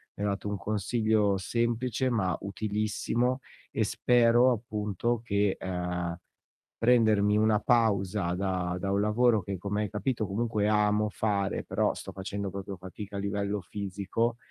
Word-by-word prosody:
mi 100 Hz, -, -5 dB
hai 105 Hz, -, +1 dB
dato 100 Hz, +1 st, -3 dB
un 105 Hz, -1 st, -2 dB
consiglio 105 Hz, 0 st, +1 dB
semplice, 120 Hz, +5 st, 0 dB
ma 95 Hz, -8 st, +1 dB
utilissimo 110 Hz, +5 st, -1 dB, 0.3 s
e 110 Hz, -, +1 dB
spero 120 Hz, +3 st, +4 dB
appunto 110 Hz, 0 st, -2 dB
che, 100 Hz, -3 st, +1 dB
ehm, 90 Hz, -2 st, -3 dB, 0.6 s
prendermi 110 Hz, -4 st, +4 dB
una 110 Hz, 0 st, +3 dB
pausa 100 Hz, -6 st, +2 dB
da 90 Hz, -1 st, -1 dB
da 95 Hz, +1 st, -2 dB
un 100 Hz, +1 st, +2 dB
lavoro 110 Hz, +1 st, +3 dB
che, 95 Hz, +1 st, -4 dB
come 100 Hz, +3 st, -2 dB
hai 105 Hz, -, -3 dB
capito 110 Hz, +1 st, -1 dB
comunque 105 Hz, +1 st, 0 dB
amo 105 Hz, 0 st, +2 dB
fare 100 Hz, -2 st, -1 dB
però -, -, 0 dB
sto -, -, -7 dB
facendo 100 Hz, 0 st, -4 dB
proprio 100 Hz, 0 st, -6 dB
fatica 100 Hz, +3 st, -8 dB
a -, -, -2 dB
livello 100 Hz, 0 st, -2 dB
fisico, 100 Hz, +5 st, -2 dB
105 Hz, 145 wpm, -29 LUFS, 100-115 Hz, 0.6 s, spero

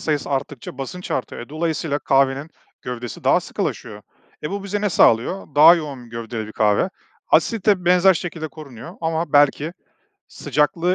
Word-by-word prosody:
sayısı 150 Hz, -2 st, -2 dB
arttıkça 135 Hz, -1 st, -4 dB
basınç 180 Hz, +7 st, -6 dB
artıyor. 130 Hz, -, -3 dB
E, 120 Hz, -, -12 dB
dolayısıyla 155 Hz, -1 st, -2 dB
kahvenin 135 Hz, +3 st, +1 dB, 0.3 s
gövdesi 120 Hz, -2 st, -7 dB
daha -, -, +4 dB
sıkılaşıyor. -, -, -5 dB, 0.4 s
E, 150 Hz, -, -3 dB
bu 200 Hz, 0 st, -4 dB
bize 200 Hz, +1 st, -2 dB
ne 210 Hz, -1 st, 0 dB
sağlıyor? 130 Hz, +6 st, +3 dB
Daha 155 Hz, +4 st, +9 dB
yoğun 145 Hz, -7 st, -5 dB
bir 115 Hz, -, -18 dB
gövdede 115 Hz, -1 st, -5 dB
bir 110 Hz, -, -10 dB
kahve. 105 Hz, -, +2 dB, 0.4 s
Asidite 210 Hz, -5 st, +2 dB
benzer 180 Hz, +2 st, +5 dB
şekilde 165 Hz, -2 st, -5 dB
korunuyor 145 Hz, +1 st, -11 dB
ama 160 Hz, -1 st, -2 dB
belki 145 Hz, +2 st, +3 dB, 0.6 s
sıcaklığı 165 Hz, +4 st, 0 dB
150 Hz, 155 wpm, -21 LUFS, 135-175 Hz, 0.6 s, Daha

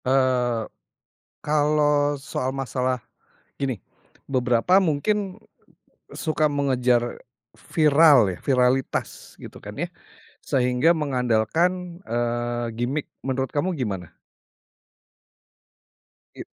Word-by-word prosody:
Eee, 125 Hz, -3 st, +2 dB, 0.8 s
kalau 150 Hz, -1 st, +2 dB
soal 130 Hz, -1 st, -4 dB
masalah, 130 Hz, -2 st, -2 dB, 0.5 s
gini, 130 Hz, -5 st, -3 dB, 0.5 s
beberapa 130 Hz, +8 st, +3 dB
mungkin, 190 Hz, +5 st, -1 dB, 0.7 s
suka 155 Hz, -1 st, 0 dB
mengejar, 125 Hz, -4 st, +1 dB, 0.5 s
viral 150 Hz, -, +6 dB
ya, -, -, -7 dB
viralitas 130 Hz, 0 st, 0 dB
gitu -, -, -11 dB
kan -, -, -9 dB
ya, -, -, -2 dB, 0.6 s
sehingga 125 Hz, +4 st, +2 dB
mengandalkan, 160 Hz, -, 0 dB
eee, 120 Hz, -1 st, -2 dB
gimik. 130 Hz, +6 st, -2 dB, 0.2 s
Menurut 135 Hz, 0 st, -1 dB
kamu, 175 Hz, +6 st, +1 dB
gimana? 95 Hz, -8 st, -3 dB, 2.2 s
Iya. -, -, -7 dB
135 Hz, 85 wpm, -24 LUFS, 125-150 Hz, 2.2 s, viral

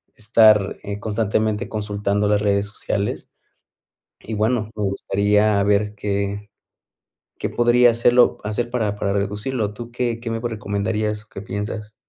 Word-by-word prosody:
estar, 110 Hz, -3 st, +4 dB
eh, 100 Hz, 0 st, -5 dB
constantemente 110 Hz, 0 st, -1 dB
consultando 105 Hz, -1 st, -1 dB
las 105 Hz, 0 st, +2 dB
redes 100 Hz, 0 st, +1 dB
sociales. 100 Hz, -1 st, -3 dB, 0.9 s
Y 110 Hz, -, -5 dB
bueno, 110 Hz, 0 st, 0 dB
me 105 Hz, -, -3 dB
gustaría 100 Hz, +1 st, +2 dB
ver 105 Hz, +1 st, +1 dB
qué 100 Hz, 0 st, -3 dB, 0.9 s
que -, -, -2 dB
podría 120 Hz, 0 st, +4 dB
hacerlo 120 Hz, +1 st, +4 dB
hacer 110 Hz, +3 st, -2 dB
para, 110 Hz, -5 st, -1 dB
para 100 Hz, -1 st, -1 dB
reducirlo. 105 Hz, +2 st, -2 dB
¿Tú 120 Hz, +1 st, -8 dB
qué? 120 Hz, -2 st, -2 dB
¿Qué 115 Hz, -1 st, -5 dB
me 115 Hz, -, -2 dB
recomendarías 105 Hz, -1 st, -2 dB
o -, -, -38 dB
qué -, -, -8 dB
piensas? 105 Hz, +1 st, -5 dB
105 Hz, 140 wpm, -21 LUFS, 100-115 Hz, 0.9 s, estar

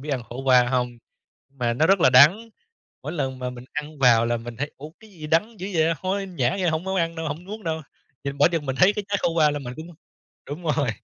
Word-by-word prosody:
biết 150 Hz, -, -10 dB
ăn 130 Hz, -3 st, -2 dB
khổ 120 Hz, +3 st, -8 dB
qua 125 Hz, -2 st, +5 dB
hông? 125 Hz, -1 st, 0 dB, 0.6 s
Mà 125 Hz, -4 st, -2 dB
nó 155 Hz, +6 st, +2 dB
rất 195 Hz, -1 st, +4 dB
là 130 Hz, -, +5 dB
đắng, 170 Hz, -, +6 dB, 0.5 s
mỗi -, -, -4 dB
lần 135 Hz, -5 st, -3 dB
mà 125 Hz, 0 st, -3 dB
mình 125 Hz, 0 st, -10 dB
ăn 150 Hz, 0 st, -6 dB
vào 120 Hz, -3 st, +5 dB
là 120 Hz, 0 st, 0 dB
mình 115 Hz, 0 st, -9 dB
thấy 145 Hz, +2 st, -3 dB
"Ủa, 150 Hz, +3 st, -9 dB
cái 220 Hz, -, -17 dB
gì 155 Hz, -4 st, -9 dB
đắng 210 Hz, +8 st, 0 dB
dữ 190 Hz, -, -4 dB
vậy." 165 Hz, 0 st, +2 dB
hôi 195 Hz, +1 st, -2 dB
nhả 175 Hz, +1 st, -1 dB
ra 180 Hz, -3 st, +1 dB
hổng 160 Hz, +2 st, -2 dB
muốn 190 Hz, 0 st, -3 dB
ăn 165 Hz, 0 st, -1 dB
đâu, 160 Hz, -1 st, -4 dB
hổng 155 Hz, +5 st, -5 dB
nuốt 215 Hz, +2 st, -8 dB
đâu, 160 Hz, -1 st, -2 dB, 0.4 s
nhìn 140 Hz, 0 st, -4 dB
bởi -, -, +5 dB
chừng 165 Hz, -4 st, -2 dB
mình 130 Hz, -, -2 dB
thấy 185 Hz, +8 st, +5 dB
cái 210 Hz, -1 st, -4 dB
trái 200 Hz, -, +1 dB
khổ -, -, +2 dB
qua 155 Hz, -3 st, +3 dB
là 145 Hz, -, -3 dB
mình 125 Hz, -2 st, -7 dB
cũng 160 Hz, +2 st, -8 dB, 0.6 s
đúng 150 Hz, +5 st, -7 dB
rồi. 145 Hz, -4 st, +1 dB
150 Hz, 265 wpm, -24 LUFS, 130-175 Hz, 0.6 s, đắng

